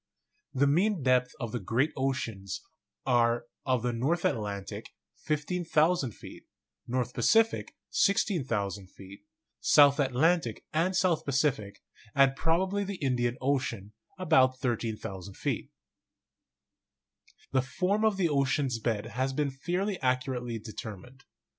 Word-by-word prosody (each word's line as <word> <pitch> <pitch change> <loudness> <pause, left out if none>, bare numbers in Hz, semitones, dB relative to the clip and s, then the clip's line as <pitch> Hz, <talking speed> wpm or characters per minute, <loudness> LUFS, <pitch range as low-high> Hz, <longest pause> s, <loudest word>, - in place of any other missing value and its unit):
The 140 +1 +2
mean 175 +4 +2
depths 125 -1 +2
of 120 -3 -4
the 120 - -2
great 120 +9 0
oceans 115 -8 -3 0.4
are: 120 -2 +2 0.2
of 130 -3 +1
the 125 -1 0
North 145 +9 0
Atlantic, 100 -3 -3 0.3
15,000 160 -1 +1
feet; - - -12 0.4
North 125 0 -1
Pacific, 225 0 +2 0.2
16,000 115 - 0
feet; 100 +2 -14 0.3
South 145 0 +6
Atlantic 140 -1 +1
and 170 +4 +1
South 175 -4 +2
Pacific, 135 -8 -1 0.3
and 135 -1 +5
probably 185 +6 +1
the 200 0 -4
Indian 125 -6 0
Ocean, 125 -7 -1 0.2
about 130 -8 +3
13,000 110 -6 -4
feet. - - -2 1.8
The 130 - +3
form 185 - -1
of 215 -3 +2
the 185 -3 +2
ocean's 140 -4 +1
bed 110 -2 -1
has 130 +3 -2
been 145 0 0
fairly 180 +8 -2
accurately 125 -2 -1
determined. 110 +4 -9
130 Hz, 115 wpm, -29 LUFS, 120-160 Hz, 1.8 s, South